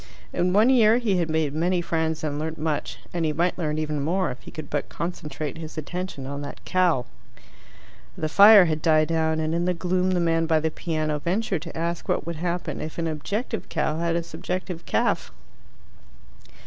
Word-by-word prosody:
In 180 +1 +1
one 215 +7 +5
year 230 -3 +6
he 220 -6 +1
had 170 -2 0
made 155 -2 0
many 175 +4 +1
friends 160 -2 -1
and 145 -1 -2
learnt 160 +1 -3
much, 155 -1 -2 0.2
and 170 -1 -1
he 155 - +1
might 175 +4 +1
learn 155 -4 -2
even 150 -2 -2
more 180 +4 0
if 125 - -9
he - - -11
could 155 -2 -8
but 145 0 -3
concentrate 155 -3 -5
his 160 -1 -8
attention 165 -2 -5
on 140 +1 -5
that 145 - -8
cow. 175 -9 +2 1.1
The 155 - -1
fire 200 +3 +8
had 155 -2 -1
died 155 -1 +3
down, 160 -1 +1
and 155 0 -1
in 170 +1 0
the 180 0 +1
gloom 180 +1 0
the 185 -1 +1
man 165 -1 +2
by 160 -1 +3
the 160 +1 -1
piano 155 -2 -2
ventured 185 +1 -1
to 165 -1 -8
ask 170 +1 -3
what - - 0
would 170 -1 -4
happen 175 +2 -3
if 155 - -6
an 170 - -1
objective 200 - -3
cow 155 +1 -1
had 170 0 0
a 170 - 0
subjective 180 +1 -5
calf. - - 0
165 Hz, 200 wpm, -25 LUFS, 155-180 Hz, 1.1 s, fire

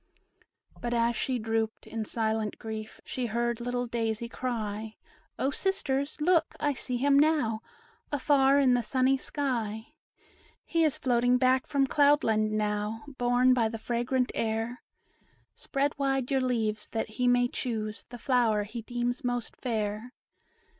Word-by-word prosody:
But 240 0 -2
as 235 0 +2
she 255 +3 -1
drooped, 225 -1 -2
in 225 -1 -4
silent 220 -1 -1
grief, 220 -1 -7
She 250 -2 -3
heard 235 +1 -1
little 245 0 -1
Daisy 230 -1 -2
cry, 220 -3 -4 0.4
"O 270 - 0
sisters, 280 -6 -1
look! 335 +2 +2
I 290 -1 +1
see 250 -1 -2
him 280 +2 +4
now, 290 -8 +2 0.5
Afar 280 -1 +4
in 265 -3 +4
the 245 - +3
sunny 260 +3 +2
sky; 245 -3 -3 0.7
He 330 -1 +1
is 310 -3 +2
floating 245 0 +2
back 255 0 +2
from 280 -2 +2
Cloud 290 +2 +4
Land 215 -1 +2
now, 210 +1 -1 0.2
Borne 245 +1 +4
by 230 -3 +2
the 225 - -5
fragrant 240 +3 -1
air. 225 +2 -2 0.7
Spread 280 +1 -1
wide 270 -2 0
your 270 -1 +2
leaves, 220 -4 -1
that 225 - -2
he 250 +3 -1
may 245 0 +4
choose 220 -3 -4
The 245 - -10
flower 235 -4 +2
he 220 +3 -6
deems 245 +3 -2
most 245 -2 -2
fair." 220 0 -3
245 Hz, 145 wpm, -29 LUFS, 220-265 Hz, 0.7 s, him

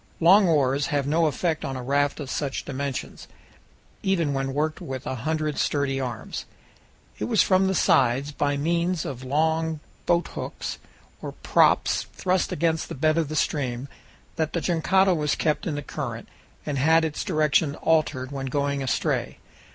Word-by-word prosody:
Long 190 +4 +6
oars 140 -3 +2
have 145 -4 0
no 160 +3 +2
effect 155 +3 -1
on 135 - -3
a 130 - -5
raft 140 +3 +1
of 140 -3 -5
such 140 -3 -3
dimensions, 140 -1 -5 0.7
even 170 -7 +1
when 135 0 -2
worked 155 +1 -1
with 130 0 -6
a - - -2
hundred 155 +4 -2
sturdy 140 -2 0
arms. 120 -4 -5 0.7
It - - -1
was 225 -4 +3
from 190 0 +3
the 190 - 0
sides, 135 +1 +3
by 145 -1 0
means 170 +3 0
of 130 -2 -6
long 160 +3 0 0.3
boathooks 175 0 -2 0.4
or - - -6
props - - +2
thrust 185 -1 0
against 165 -1 0
the - - -5
bed 155 +4 +2
of 160 -3 -1
the 155 - -4
stream, 130 -4 -1 0.5
that 160 -1 -1
the 170 - 0
jangada 185 +3 +3
was 150 -3 0
kept 155 +1 0
in 155 - -1
the 145 - -4
current, 120 -7 -5 0.4
and 145 -3 -2
had 160 +3 +4
its 155 -2 -3
direction 155 -3 +2
altered 150 -6 0
when 135 -1 -4
going 140 +1 -1
astray. 130 - -1
150 Hz, 165 wpm, -25 LUFS, 135-160 Hz, 0.7 s, Long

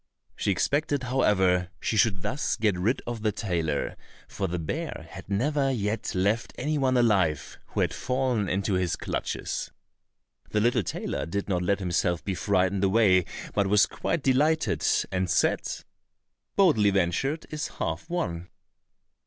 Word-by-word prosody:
She - - -2
expected, 140 +8 +1
however, 95 -8 +2
she - - -1
should 100 -4 +2
thus 135 0 -1
get 105 -3 +1
rid 105 +9 0
of 120 -2 -4
the 110 -1 +1
tailor, 85 -8 -2 0.3
for 95 - -3
the 90 0 -3
bear 120 - -4
had 95 +2 -10
never 135 +7 +1
yet 110 -4 -2
left 100 +5 0
any 155 +1 -1
one 130 -2 +2
alive 95 - +1
who - - -2
had - - +1
fallen 125 -6 0
into 100 +2 0
his 90 -2 +1
clutches. - - -3 0.8
The 105 - +1
little 120 +2 +3
tailor 80 - -3
did 100 +4 -3
not 90 -3 0
let 100 +3 +1
himself 90 -2 0
be 95 - -1
frightened 95 +1 +1
away, 95 -3 +4 0.3
but 100 -1 +2
was 105 +2 +5
quite 145 - -2
delighted, 150 +5 +2 0.3
and 90 -1 -1
said, - - +2 0.9
"Boldly 150 - +5
ventured 100 - 0
is 155 +2 -3
half - - -4
won." 90 - -3
100 Hz, 150 wpm, -27 LUFS, 90-130 Hz, 0.9 s, was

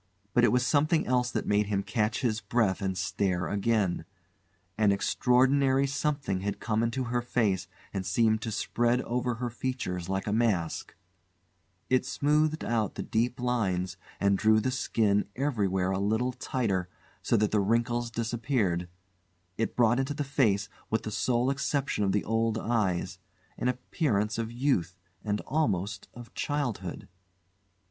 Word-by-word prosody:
But 120 - +4
it 120 - +5
was 125 0 +2
something 155 +3 +2
else 125 -1 +1
that - - -2
made 105 0 +2
him 100 -1 0
catch 105 +2 0
his 115 -3 0
breath 110 -5 +1
and 95 -1 -1
stare 95 -2 0
again. 100 -1 0 0.7
An 105 -1 +3
extraordinary 130 +6 +3
something 140 -7 -1
had 100 +1 -3
come 110 -1 0
into 115 +3 0
her 120 0 -1
face 110 -6 0 0.3
and 95 - -2
seemed 110 +3 +2
to 115 - -3
spread 120 +3 +1
over 125 0 -1
her 120 +1 -3
features 105 -8 -3
like 95 0 -1
a 105 - -1
mask; 105 -8 0 0.9
it 130 0 +3
smoothed 150 +4 +1
out 110 -3 0
the - - -3
deep 120 +3 0
lines 100 -8 0 0.2
and 100 -1 +2
drew 110 0 +5
the 130 +4 0
skin 105 -5 +1
everywhere 100 -9 0
a 95 - 0
little 110 +5 +1
tighter 105 -8 -1 0.3
so - - +2
that 105 0 +1
the 105 - +3
wrinkles 120 +3 +1
disappeared; 115 -6 -1 0.7
it 115 - -2
brought 120 +1 +4
into 135 +2 -1
the 145 - -1
face 110 -8 +1 0.2
with 110 0 0
the 110 - -4
sole 120 +4 +1
exception 140 -4 -1
of 95 - +2
the 105 - +1
old 115 0 +1
eyes 95 -6 -1 0.4
an - - -2
appearance 120 - 0
of 115 0 -3
youth 120 - 0 0.3
and 105 -1 -1
almost 100 - -1
of 120 -1 -11
childhood. 120 - -3
115 Hz, 155 wpm, -29 LUFS, 100-125 Hz, 0.9 s, it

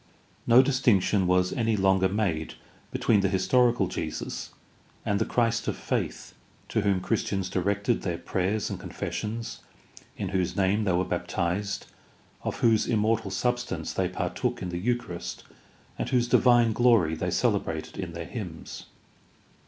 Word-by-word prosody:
No 120 +3 +8
distinction 115 -8 +2
Vas 90 0 +2
any 115 -4 +1
longer 95 -1 +3
made 95 -6 -1 0.3
between 110 -3 +2
the 100 -1 +2
historical 120 +3 +3
Jesus 80 -3 -4 0.6
and 100 0 +1
the 110 - +1
Christ 115 -1 +1
of - - -1
faith - - -3 0.4
to - - +1
whom 100 -2 +1
Christians 95 -3 -1
directed 100 +5 0
their 85 -3 -2
prayers 95 +5 -1
and - - -4
confessions, 115 +2 -5 0.6
in - - -3
whose 95 -3 -1
name 100 +2 +2
they 95 - +2
were 90 +1 +1
baptized, 100 +3 -2 0.6
of - - -4
whose 110 -2 +4
immortal 110 -2 +1
substance 120 +4 -2
they - - 0
partook - - -2
in 90 - -3
the 90 0 -3
Eucharist, 115 -5 -3 0.6
and - - -2
whose 125 -2 +2
divine 120 -2 +5
glory 115 -9 +4
they 90 +3 -2
cele 105 +3 +2
brated 80 -3 -6
in 90 -3 -4
their 85 0 -5
hymns. 90 -3 -7
100 Hz, 145 wpm, -27 LUFS, 90-115 Hz, 0.6 s, No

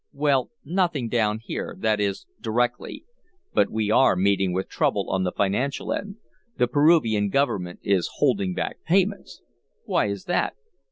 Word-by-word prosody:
"Well, 140 -2 +1 0.2
nothing 165 -7 0
down 110 -2 +1
here - - -5
that 110 -1 +1
is, 100 -1 -2 0.2
directly 120 +2 -2 0.5
but - - +3
we 110 -1 -1
are 130 -2 +5
meeting 95 0 +2
with 95 +2 -2
trouble - - 0
on 95 0 +1
the 90 - 0
financial 105 +10 -1
end. 200 -1 -5 0.4
The 125 - +3
Peruvian 125 -8 +3
government 95 -8 -1
is 95 -3 +1
holding 185 +5 +1
back - - -3
payments." 195 +3 0 0.4
"Why - - +1
is 100 -1 -4
that?" - - 0
115 Hz, 150 wpm, -24 LUFS, 100-145 Hz, 0.5 s, are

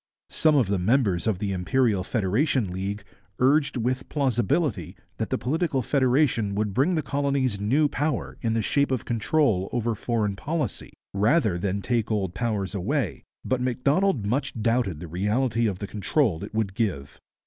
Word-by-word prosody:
Some 155 -1 +3
of 135 -5 +4
the 100 -1 -1
members 100 -3 +1
of 110 -4 +1
the 100 +1 -2
Imperial 100 +2 +1
Federation 110 - 0
League 100 +3 -4 0.3
urged 140 +2 +3
with 125 +2 -2
plausibility 125 - 0 0.2
that - - -2
political 145 -1 -1
federation 130 -6 +2
would 105 -1 -1
bring 145 - +2
the 155 - 0
colonies 140 -6 0
new 140 +9 +3
power 145 -2 -2
in 115 -1 0
the 115 - 0
shape 140 +6 +1
of 130 -4 -2
control 115 -4 +1
over 120 -1 0
foreign 110 -2 -1
policy, 155 +9 -3 0.2
rather 105 - +2
than 100 +1 -2
take 120 -3 0
old 100 -5 -1
powers 105 -3 -2
away, 120 +9 -1 0.2
but 130 -1 0
Macdonald 130 - +1
much 125 +2 -1
doubted 115 -7 0
the 90 - -6
reality 110 +7 0
of 100 -4 -2
the 100 - -5
control 100 - 0
it 100 - -7
would 110 -3 0
give. 90 - -3
115 Hz, 160 wpm, -25 LUFS, 100-135 Hz, 0.3 s, of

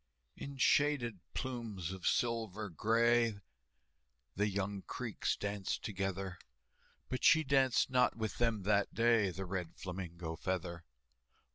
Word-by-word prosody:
In 140 -1 -7
shaded 130 -6 +3 0.2
plumes 115 -9 -4
of 95 -2 -4
silver 110 -3 0
gray, 115 +3 +2 1.0
The 105 +2 +2
young 100 0 -2
Creeks - - -2
danced 100 -2 -3
together, 95 -2 -3 0.7
But 130 - -4
she 160 -1 +6
danced 135 -3 +3
not 125 -1 +3
with 110 -3 -4
them 115 -4 +1
that 100 0 +2
day, 115 -3 +4
The 95 +2 -5
Red 90 -2 -4
Flamingo 85 -3 -5
Feather. 85 -1 -3
105 Hz, 120 wpm, -35 LUFS, 95-120 Hz, 1.0 s, she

